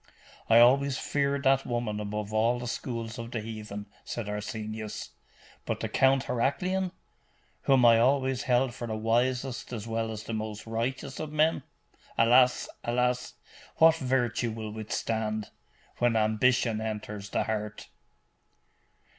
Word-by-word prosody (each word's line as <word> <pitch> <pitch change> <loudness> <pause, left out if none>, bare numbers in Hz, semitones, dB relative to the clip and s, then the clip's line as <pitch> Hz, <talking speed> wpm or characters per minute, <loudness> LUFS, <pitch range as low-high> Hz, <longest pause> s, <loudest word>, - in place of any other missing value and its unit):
'I 115 +1 +8
always 135 +2 +5
feared 140 -1 0
that 135 -1 +4
woman 120 -3 -2
above 105 0 -4
all 115 +3 +2
the 120 - -6
schools 115 -1 -4
of 115 0 -6
the 120 - -3
heathen,' 105 -2 -6 0.2
said 120 -3 -5
Arsenius. 110 0 -5 0.5
'But - - -3
the - - -3
Count 135 0 +3
Heraclian, 180 +10 0 0.7
whom 130 -3 +5
I 115 -1 +7
always 130 +1 +2
held 125 -1 +2
for 120 -1 -6
the 110 - -3
wisest 120 +4 0
as 115 -4 -5
well 115 0 -1
as 110 -1 -6
the 115 - -5
most 110 -1 -4
righteous 120 +4 -3
of 155 -1 -4
men! 155 +2 +2 0.6
Alas! 125 +2 +5 0.2
alas! 125 +1 0 0.4
what 160 0 +6
virtue 125 -4 0
will 110 -1 -5
withstand, 110 0 -3 0.5
when 120 -1 +3
ambition 110 +1 +2
enters 105 -2 -5
the - - 0
heart! 105 -1 -4
115 Hz, 140 wpm, -28 LUFS, 110-130 Hz, 0.7 s, I